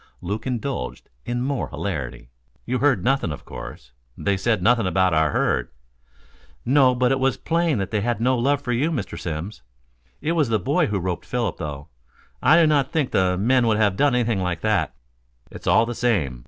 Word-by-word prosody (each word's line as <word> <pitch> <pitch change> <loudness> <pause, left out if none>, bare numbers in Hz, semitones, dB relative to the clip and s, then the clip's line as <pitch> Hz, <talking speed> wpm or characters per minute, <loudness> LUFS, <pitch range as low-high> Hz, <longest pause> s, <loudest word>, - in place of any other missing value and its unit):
Luke 105 +7 -4
indulged 130 +2 -4 0.2
in 120 0 -1
more 135 -1 -2
hilarity. 65 -10 -5 0.3
"You 125 +1 -1
heard 145 -2 +2
nothing, 135 - +1
of 75 - -8
course - - -9 0.3
they 100 -1 0
said 100 0 0
nothing 115 -2 +3
about 95 -1 +2
our 80 -1 +3
herd - - 0 0.5
" - - -31
"No, 130 -2 +5
but 125 0 +2
it 135 - +1
was 130 -1 +1
plain 165 -3 0
that 95 -2 -3
they 105 -2 0
had 120 0 -1
no 125 +3 +2
love 140 +4 +1
for 125 - -2
you, 130 +7 +1
Mr. 135 - -3
Simms. 85 +1 -5 0.6
It 160 - -1
was 155 -7 +1
the 110 - +2
boy 90 - +1
who 105 - -1
roped 90 -1 -3
Philip, 115 -7 -2
though. 75 -3 -6 0.5
I 160 - +6
do 165 - +6
not 145 -3 +2
think 150 -5 0
the 90 -1 +2
men 120 +4 +3
would 110 -2 +2
have 105 -3 +2
done 140 +3 +2
anything 115 -4 +1
like 90 -3 -2
that." 105 -8 0 0.6
"It's - - -10
all 115 - +5
the 120 - -4
same. 95 - 0
115 Hz, 200 wpm, -23 LUFS, 90-130 Hz, 0.6 s, I